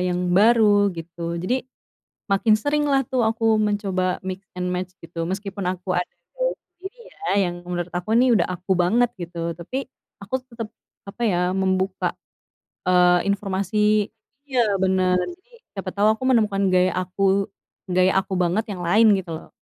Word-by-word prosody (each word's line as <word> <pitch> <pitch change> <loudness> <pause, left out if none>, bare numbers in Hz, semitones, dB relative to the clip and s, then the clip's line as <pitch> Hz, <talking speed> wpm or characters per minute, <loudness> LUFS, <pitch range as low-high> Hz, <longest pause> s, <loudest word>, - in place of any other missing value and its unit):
yang 180 0 0
baru 205 0 +5
gitu. 170 +1 -5
Jadi, 245 +10 -1 0.7
makin 215 +2 +4
sering 290 +6 0
lah 270 -1 +3
tuh 250 0 -1
aku 225 -1 +2
mencoba 195 -3 0
mix 190 +1 -6
and 180 0 -2
match 180 0 -4
gitu, 165 0 -5
meskipun 195 0 -4
aku 185 +1 -5
ada 180 0 0 0.3
gaya - - 0
sendiri 385 +7 -13
ya, 405 - -9 0.2
yang 175 - -6
menurut 175 0 -3
aku 180 +6 -1
ini 250 +1 +5
udah 195 -7 +3
aku 185 +1 -5
banget 230 +7 +3
gitu. 170 -1 -4
Tapi, 255 +11 -5 0.4
aku 205 +6 -3
tetap, 230 -3 -7 0.3
apa 200 +4 -10
ya, 180 -2 +1
membuka, 190 0 0 0.7
eee, 180 0 +4
informasi 200 +1 +1 0.4
iya 240 -7 +1
benar, 185 -1 +2
jadi 360 - -6 0.2
siapa 195 -2 -6
tahu 200 +2 0
aku 220 - -15
menemukan 205 -5 +2
gaya 185 0 +3
aku 195 +2 +1 0.4
gaya 185 +1 +3
aku 190 0 -4
banget 180 +5 +1
yang 180 -3 -5
lain, 210 +3 +5
gitu 175 -3 -6
loh. 160 - -10
195 Hz, 160 wpm, -23 LUFS, 180-220 Hz, 0.7 s, baru